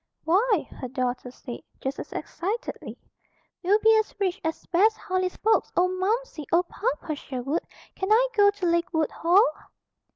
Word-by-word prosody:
"Why!" 395 Hz, +2 st, +2 dB
her 255 Hz, -, -3 dB
daughter 250 Hz, 0 st, -2 dB
said, 245 Hz, -1 st, -8 dB, 0.2 s
just 265 Hz, +1 st, -4 dB
as -, -, -7 dB
excitedly, 430 Hz, +8 st, -4 dB, 0.6 s
"we'll 385 Hz, +3 st, +4 dB
be 445 Hz, 0 st, +7 dB
as 435 Hz, -, -3 dB
rich 375 Hz, -3 st, -1 dB
as 320 Hz, 0 st, -3 dB
Bess 420 Hz, +5 st, +3 dB
Harley's 370 Hz, 0 st, -2 dB
folks. 440 Hz, +1 st, +2 dB
Oh, 360 Hz, +1 st, +4 dB
Momsey! 375 Hz, -, -2 dB
Oh, 340 Hz, +2 st, +4 dB
Papa 365 Hz, -3 st, -3 dB
Sherwood! 275 Hz, +2 st, -3 dB, 0.3 s
Can 380 Hz, +2 st, -3 dB
I 480 Hz, +3 st, +5 dB
go 410 Hz, -1 st, +6 dB
to 405 Hz, -2 st, -3 dB
Lakewood 340 Hz, -2 st, +1 dB
Hall?" 360 Hz, +6 st, +4 dB
365 Hz, 155 wpm, -26 LUFS, 320-415 Hz, 0.6 s, be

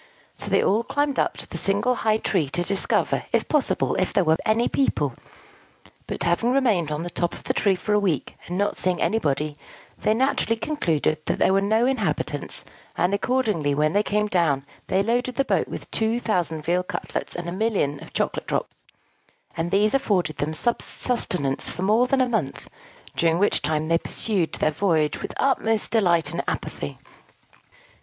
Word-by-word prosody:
So -, -, -4 dB
they -, -, +3 dB
all 210 Hz, +4 st, +3 dB
climbed 285 Hz, +2 st, 0 dB
up -, -, 0 dB
the -, -, -6 dB
single 200 Hz, +6 st, +2 dB
high 220 Hz, -3 st, +1 dB
tree 175 Hz, -9 st, 0 dB
to 175 Hz, +5 st, -1 dB
discover, 195 Hz, +2 st, +1 dB
if -, -, +1 dB
possible, 300 Hz, -4 st, +1 dB
if 185 Hz, -, 0 dB
there 195 Hz, -, +2 dB
were 160 Hz, -1 st, +3 dB
any 225 Hz, +2 st, +3 dB
people; 150 Hz, -, 0 dB, 0.9 s
but -, -, -3 dB
having 175 Hz, +8 st, +2 dB
remained 220 Hz, -, +2 dB
on 150 Hz, +2 st, -2 dB
the 175 Hz, -, -5 dB
top 175 Hz, 0 st, -2 dB
of -, -, -12 dB
the -, -, -1 dB
tree 200 Hz, -3 st, +2 dB
for 210 Hz, +3 st, -2 dB
a 210 Hz, -, +4 dB
week, 180 Hz, -9 st, -1 dB
and 180 Hz, -, -3 dB
not 205 Hz, +1 st, 0 dB
seeing 185 Hz, -1 st, +1 dB
anybody, 150 Hz, -8 st, 0 dB, 0.4 s
they 215 Hz, -, +2 dB
naturally 250 Hz, -2 st, +1 dB
concluded 165 Hz, -, -1 dB
that -, -, 0 dB
there -, -, +3 dB
were 195 Hz, -, +3 dB
no 220 Hz, +4 st, +2 dB
inhabitants; 195 Hz, -, -2 dB, 0.3 s
and 180 Hz, +3 st, +2 dB
accordingly, 200 Hz, -, +1 dB
when 155 Hz, +2 st, +1 dB
they 205 Hz, -, +4 dB
came 210 Hz, 0 st, 0 dB
down, 165 Hz, -9 st, +1 dB, 0.2 s
they 195 Hz, -, +2 dB
loaded 245 Hz, +3 st, 0 dB
the 275 Hz, -, +1 dB
boat -, -, +1 dB
with -, -, -8 dB
two 225 Hz, +2 st, 0 dB
thousand 175 Hz, -9 st, -1 dB
veal 175 Hz, +3 st, +1 dB
cutlets 180 Hz, -, -4 dB
and 175 Hz, 0 st, -5 dB
a -, -, -3 dB
million 185 Hz, -8 st, 0 dB
of -, -, -11 dB
chocolate -, -, -2 dB
drops; -, -, -3 dB, 0.7 s
and 165 Hz, +1 st, -2 dB
these 205 Hz, +3 st, +2 dB
afforded 185 Hz, -, +1 dB
them 155 Hz, +2 st, -2 dB
sustenance 180 Hz, -, 0 dB
for 180 Hz, -, -4 dB
more 220 Hz, +6 st, +3 dB
than 265 Hz, 0 st, +2 dB
a 255 Hz, -, +3 dB
month, 215 Hz, -, -3 dB, 0.4 s
during 165 Hz, 0 st, +2 dB
which 205 Hz, +3 st, +2 dB
time 155 Hz, 0 st, -1 dB
they 165 Hz, 0 st, +3 dB
pursued 190 Hz, -5 st, -1 dB
their 155 Hz, -, +1 dB
voyage 155 Hz, -3 st, +1 dB
with -, -, -4 dB
the -, -, -3 dB
utmost 225 Hz, -6 st, +1 dB
delight 175 Hz, -7 st, +3 dB
and -, -, -2 dB
apathy. 70 Hz, -1 st, -4 dB
195 Hz, 185 wpm, -24 LUFS, 160-225 Hz, 0.9 s, a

